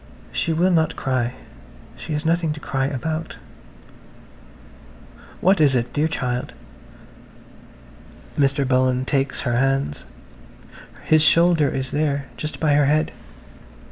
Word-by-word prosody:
She 165 - -1
will 175 +4 +2
not 160 -2 +2
cry–she 120 - -5
has 150 +2 -3
nothing 165 -1 +1
to 150 - -9
cry 135 -2 -2
about.... 155 +4 -4 2.1
"What 190 -2 +3
is 140 -3 +4
it, 120 -1 -1
dear 150 +2 +1
child?" 125 -6 -3 1.8
Mr. 140 -1 +1
Bullen 130 0 +2
takes 135 0 -1
her 120 -2 0
hands. 135 - 0 1.0
His 155 -1 +4
shoulder 165 -1 +4
is 130 0 -3
there–just 140 -2 -3
by 150 -2 +2
her 145 -1 +3
head. 155 +2 +1
140 Hz, 110 wpm, -22 LUFS, 130-155 Hz, 2.1 s, is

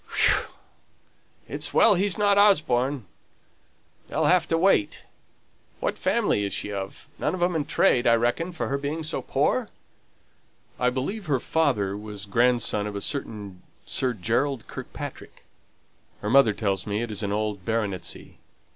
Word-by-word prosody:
"Whew! - - +3 1.0
It's - - -4
well 225 - +7
he's 195 +1 +1
not 205 -1 +4
Osborne. 145 - +3 1.0
They'll - - 0
have 180 -1 +4
to 165 - +1
wait. 165 - +2 0.8
What - - -1
family 105 - +1
is 100 - -2
she 105 - -3
of? 95 -1 -6
None - - 0
of 180 - -7
'em 175 -1 +1
in 150 -3 0
trade, 120 -2 +3
I 115 - +6
reckon, 120 +10 0
from 170 - -4
her 140 +1 -1
being 150 +3 -3
so 155 - -2
poor?" - - 0 1.1
"I 125 - +3
believe 155 - -4
her 140 -4 +2
father 120 -11 0
was 105 -1 -7
grandson 115 -1 +2
of 105 - -6
a - - -2
certain 105 -8 -4 0.2
Sir 130 -2 -1
Gerald 115 +5 -1
Kirkpatrick. - - -9 0.8
Her 105 - -2
mother 135 -5 +6
tells 100 -2 -2
me 105 +2 -1
it 120 - -5
is 105 - -4
an 100 -1 -2
old 105 -2 -2
baronetcy. 105 -3 -3
120 Hz, 155 wpm, -25 LUFS, 105-155 Hz, 1.1 s, well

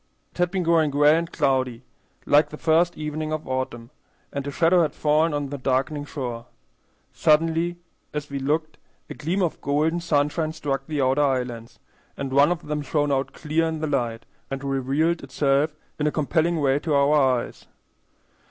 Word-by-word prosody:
It - - -18
had 180 -1 +3
been 185 0 -1
growing 165 -2 +3
gray 145 +2 +5
and 165 0 -2
cloudy, 130 -3 0 0.4
like 145 +1 +4
the 150 - -8
first 165 +2 +2
evening 155 0 -4
of 155 0 -4
autumn, 130 -2 -4 0.4
and 140 0 -4
a - - -1
shadow 165 +5 +3
had 155 -4 0
fallen 155 +2 +2
on 145 -1 -2
the 140 0 -5
darkening 135 +3 -1
shore. 120 -5 -5 0.7
Suddenly, 165 +2 +2 0.4
as 150 -1 -4
we 140 -1 -4
looked, 155 +4 -1 0.3
a - - -3
gleam 175 +6 -1
of 170 - -2
golden 155 +4 +1
sunshine 155 -1 0
struck 140 -3 -3
the 150 -3 -1
outer 130 +3 +2
islands, 125 -4 -2 0.4
and 135 -1 -4
one 140 +4 +5
of 175 - -3
them 150 0 -2
shone 145 0 0
out 135 0 -1
clear 160 +1 0
in 160 0 -2
the 155 - -2
light, 115 -6 -2 0.2
and 135 0 -5
revealed 140 +5 0
itself 140 +2 +1 0.2
in 150 - +1
a - - +1
compelling 160 +3 +1
way 140 -1 +2
to 155 -1 -1
our 140 +1 +4
eyes. 130 -5 +1
150 Hz, 180 wpm, -24 LUFS, 135-160 Hz, 0.7 s, gray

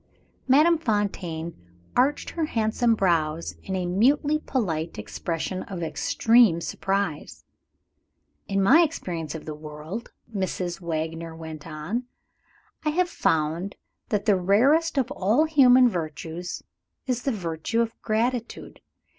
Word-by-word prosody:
Madame 305 +5 +5
Fontaine 190 - -2 0.4
arched 275 +4 +2
her 330 -2 -1
handsome 230 -2 +1
brows 165 -5 0
in 190 - -4
a 185 -1 -1
mutely 275 +11 +2
polite 170 - -2
expression 175 +2 -4
of 180 -4 -6
extreme 225 +4 +3
surprise. 195 -2 -3 1.0
"In 195 0 +1
my 275 - +7
experience 175 - -2
of 160 - -7
the 155 - -5
world," 155 +8 -8 0.2
Mrs. 185 -2 -2
Wagner 165 0 -4
went 160 -1 -8
on, 165 +11 -4 0.8
"I 305 - +1
have 350 +3 +1
found 165 - 0 0.3
that 210 -3 0
the 205 -3 +4
rarest 275 - +3
of 260 0 +1
all 225 +6 +2
human 260 -5 +6
virtues 165 -2 -4 0.4
is 250 -2 -1
the 275 - 0
virtue 175 +1 -2
of 230 -1 -1
gratitude. 235 +2 -2
195 Hz, 120 wpm, -25 LUFS, 165-250 Hz, 1.0 s, my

